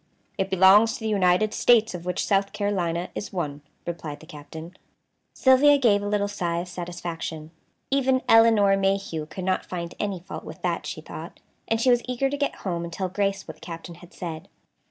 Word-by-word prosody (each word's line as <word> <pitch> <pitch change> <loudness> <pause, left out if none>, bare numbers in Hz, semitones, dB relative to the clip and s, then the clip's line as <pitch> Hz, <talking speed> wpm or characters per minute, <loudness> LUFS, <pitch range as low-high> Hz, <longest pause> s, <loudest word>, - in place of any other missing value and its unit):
"It 190 0 -1
belongs 195 +5 +6
to 270 - -9
the 220 - -2
United 200 +1 +2
States, 230 -3 +4
of 175 0 -7
which 180 - -1
South 195 -1 +1
Carolina 180 -4 -1
is 205 - -5
one," 150 -6 -4 0.2
replied 165 -4 -5
the - - -14
Captain. 160 +3 -10 0.6
Sylvia 275 +2 +6
gave 220 -7 +3
a 205 - -3
little 205 0 +1
sigh 175 -4 -2
of 175 +1 -3
satisfaction. 170 -3 -6 0.4
Even 265 -1 +2
Elinor 225 -3 +6
Mayhew 195 -5 -1
could 185 - -7
not 185 -1 0
find 170 -1 -5
any 200 -3 -2
fault 175 - -8
with - - -10
that, - - -1
she - - -5
thought, - - -9 0.3
and 225 - +1
she 250 +2 +4
was 240 -1 +4
eager 255 +2 -1
to - - -1
get 285 0 -1
home 170 -3 -2
and 170 - -6
tell 185 +2 -3
Grace 195 +1 -1
what - - -9
the - - -27
Captain 170 0 -8
had 175 +1 -15
said. 160 -3 -7
190 Hz, 195 wpm, -25 LUFS, 170-215 Hz, 0.6 s, belongs